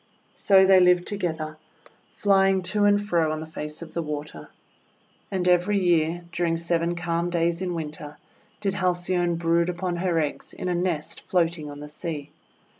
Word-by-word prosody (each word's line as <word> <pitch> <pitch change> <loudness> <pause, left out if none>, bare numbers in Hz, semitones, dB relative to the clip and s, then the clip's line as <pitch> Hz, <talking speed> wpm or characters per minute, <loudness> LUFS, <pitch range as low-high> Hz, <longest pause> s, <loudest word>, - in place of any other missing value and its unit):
So 190 -1 +5
they 190 0 +7
lived 180 -1 +4
together, 160 -6 -3 0.6
flying 195 -2 +3
to 205 -1 +3
and 205 0 +5
fro 170 -6 +1
on 155 - -3
the 160 - -6
face 155 0 -7
of 160 - -12
the 170 - -1
water. 150 - -6 0.8
And 185 -2 -1
every 180 +3 +3
year, 175 -2 +1
during 170 0 0
seven 170 0 0
calm 170 0 -1
days 170 0 0
in 180 -2 -2
Winter, 150 -2 -6 0.4
did 195 -2 0
Halcyone 175 -2 0
brood 170 +1 +1
upon 175 0 -2
her 175 -1 0
eggs 150 -2 -3
in 185 - -4
a - - +1
nest 175 -3 -2
floating 165 -4 0
on 145 0 -9
the 150 - -7
sea. 150 -1 -5
175 Hz, 170 wpm, -25 LUFS, 160-185 Hz, 0.8 s, they